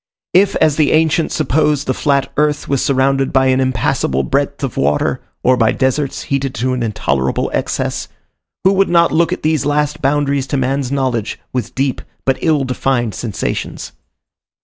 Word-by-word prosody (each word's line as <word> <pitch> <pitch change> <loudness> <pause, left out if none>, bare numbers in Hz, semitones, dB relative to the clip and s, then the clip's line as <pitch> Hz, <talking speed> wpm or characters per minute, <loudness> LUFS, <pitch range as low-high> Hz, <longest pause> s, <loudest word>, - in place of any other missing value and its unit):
If, 195 +2 +4
as 155 -2 +2
the 155 -3 +3
ancients 160 +1 +2
supposed, 150 -1 +1
the 130 - 0
flat 140 0 0
earth 150 0 0
was 140 -2 0
surrounded 135 0 +1
by 130 0 +3
an 130 0 +3
impassable 120 - 0
breadth 140 +1 -1
of 135 - -3
water, 75 +1 0 0.2
or 130 0 +4
by 115 -2 +3
deserts 130 +1 -1
heated 140 -1 -2
to 130 +3 -1
an 125 - -2
intolerable 70 - -1
excess, - - -2 0.6
who 190 +1 +4
would 195 0 +2
not 170 -1 +4
look 170 +1 +2
at - - -3
these 155 -1 +1
last 145 0 0
boundaries 140 -1 +1
to 140 - -1
man's 135 0 -1
knowledge 130 -6 -1
with 125 -4 -3
deep 135 -1 -1 0.2
but 135 -1 +1
ill 155 -4 +2
defined 125 -3 -1
sensations? 110 -5 -4
135 Hz, 170 wpm, -16 LUFS, 130-150 Hz, 0.6 s, If